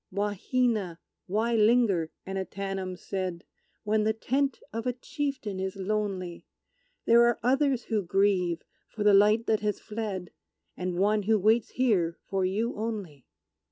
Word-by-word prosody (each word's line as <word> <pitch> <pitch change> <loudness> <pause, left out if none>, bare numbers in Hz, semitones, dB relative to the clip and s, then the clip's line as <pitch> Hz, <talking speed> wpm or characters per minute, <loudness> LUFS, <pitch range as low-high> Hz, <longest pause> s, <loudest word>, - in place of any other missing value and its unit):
"Wahina, 205 -1 0 0.3
why 220 +5 0
linger," 215 -7 +3 0.2
Annatanam 190 -1 -4
said, 185 -3 -4 0.4
"When 215 0 +1
the 220 +1 +2
tent 270 +5 -1
of 230 +2 -3
a 250 - +1
chieftain 255 -6 -4
is 190 +1 -3
lonely? 195 -3 -3 0.6
There 235 +1 +6
are 240 - +1
others 270 0 +2
who 220 -3 0
grieve 185 -2 +1 0.2
for 215 - -4
the 205 -1 +6
light 210 +3 +5
that 220 -2 +2
has 210 -1 -1
fled, 210 -5 -5 0.4
And 180 -1 -3
one 210 +3 +3
who 215 +2 +3
waits 220 +3 +3
here 195 -10 +1
for 195 -1 -1
you 210 +6 0
only!" 205 - -5
210 Hz, 140 wpm, -28 LUFS, 190-230 Hz, 0.6 s, There